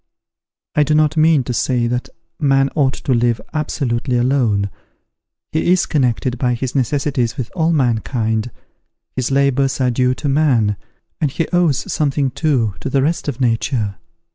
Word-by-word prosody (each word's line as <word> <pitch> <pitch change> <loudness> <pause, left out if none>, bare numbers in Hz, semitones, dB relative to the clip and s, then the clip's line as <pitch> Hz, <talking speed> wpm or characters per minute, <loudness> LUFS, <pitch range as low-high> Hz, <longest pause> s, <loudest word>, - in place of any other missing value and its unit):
I 150 - +2
do 150 +1 +2
not 155 0 +3
mean 155 -3 +4
to 125 - -3
say 120 0 0
that 125 +1 -2 0.3
man 135 -2 +3
ought 135 -4 +1
to 130 - -1
live 120 -1 +1
absolutely 130 -5 -1
alone; 120 -6 +1 0.8
he 160 +3 +1
is 185 - +3
connected 125 -3 0
by 125 -2 +1
his 125 +1 -4
necessities 135 -3 0
with 125 -3 -4
all 165 -1 +2
mankind; 115 -4 0 0.7
his 130 -2 -1
labours 140 0 +1
are 125 -1 +2
due 125 +1 +1
to 145 - -4
man: 135 -8 +2 0.4
and 150 - +1
he 165 +5 -2
owes 175 -6 +1
something 140 -2 0
too 125 -9 0
to - - -4
the 135 0 +2
rest 160 +2 -1
of 140 -3 -3
nature. 115 -4 0
130 Hz, 160 wpm, -18 LUFS, 120-145 Hz, 0.8 s, mean